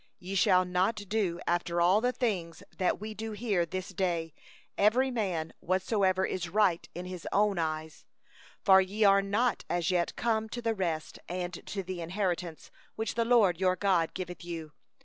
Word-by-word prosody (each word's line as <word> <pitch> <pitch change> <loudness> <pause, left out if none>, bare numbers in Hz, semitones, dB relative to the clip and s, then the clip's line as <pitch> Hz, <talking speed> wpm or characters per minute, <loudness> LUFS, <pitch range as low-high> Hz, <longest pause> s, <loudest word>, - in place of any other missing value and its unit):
8Ye 185 +2 -6
shall 185 -3 +4
not 180 +5 +1
do 205 -4 -1
after 175 0 0
all 180 +5 +4
that 195 -7 -1
we 215 +1 -6
do 220 0 -5
here 205 -6 0
this 185 +2 -4
day, 170 -4 -1 0.4
every 250 +6 +3
man 185 -9 -2
whatsoever 190 0 +1
is 175 -2 -3
right 190 -3 +2
in 180 +1 -5
his 180 -2 -7
own 205 -2 +2
eyes; 155 -1 -3 0.6
9for 190 -2 +7
ye 210 +3 -1
are 200 -1 +6
not 210 +5 0
as 175 +1 0
yet 175 -1 0
come 220 -2 0
to 240 - -5
the 225 -1 +1
rest 170 -6 -3
and 180 0 -4
to 195 -2 -3
the 180 -1 -5
inheritance, 175 -2 -3 0.2
which 220 0 -2
the 230 - +1
LORD 215 -8 +4
your 185 -1 +3
God 185 -4 +1
giveth 180 -1 -5
thee. 165 -3 -7
185 Hz, 170 wpm, -30 LUFS, 175-210 Hz, 0.6 s, 9for